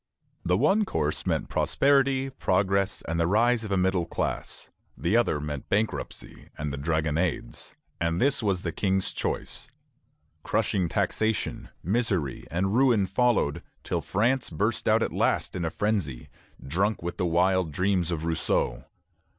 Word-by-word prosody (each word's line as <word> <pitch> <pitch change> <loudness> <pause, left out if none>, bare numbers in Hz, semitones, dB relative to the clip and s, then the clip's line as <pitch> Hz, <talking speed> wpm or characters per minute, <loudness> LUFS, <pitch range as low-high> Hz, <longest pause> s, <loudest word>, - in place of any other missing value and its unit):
The 90 +1 +2
one 205 - +3
course 75 - -2
meant - - 0
prosperity, 135 -1 +2
progress, 95 -4 0
and 85 +1 -2
the 85 - +2
rise 115 +4 +3
of 105 - -6
a 95 - +2
middle 90 -2 +1
class; - - -4 0.3
the 85 +6 0
other 120 -10 +2
meant 75 -1 -5
bankruptcy 100 -11 -3
and 75 -1 -3
the - - -4
Dragonades, 80 +2 -2 0.2
and 85 0 0
this 140 +3 +3
was 95 -4 0
the 85 - -2
King's 95 +1 0
choice. - - -4 0.7
Crushing 90 -4 0
taxation, 110 +5 -1
misery, 95 - 0
and 95 +3 0
ruin 120 -6 +4
followed, 95 - +1 0.2
till - - -2
France 120 +6 0
burst 80 - -1
out - - +4
at - - -2
last - - 0
in 90 - -2
a 80 - 0
frenzy, 95 - -2 0.4
drunk 95 +7 0
with 85 - -4
the 90 - 0
wild 90 0 +2
dreams 90 +1 +1
of 80 -2 -2
Rousseau. 80 -1 0
95 Hz, 150 wpm, -27 LUFS, 85-110 Hz, 0.7 s, ruin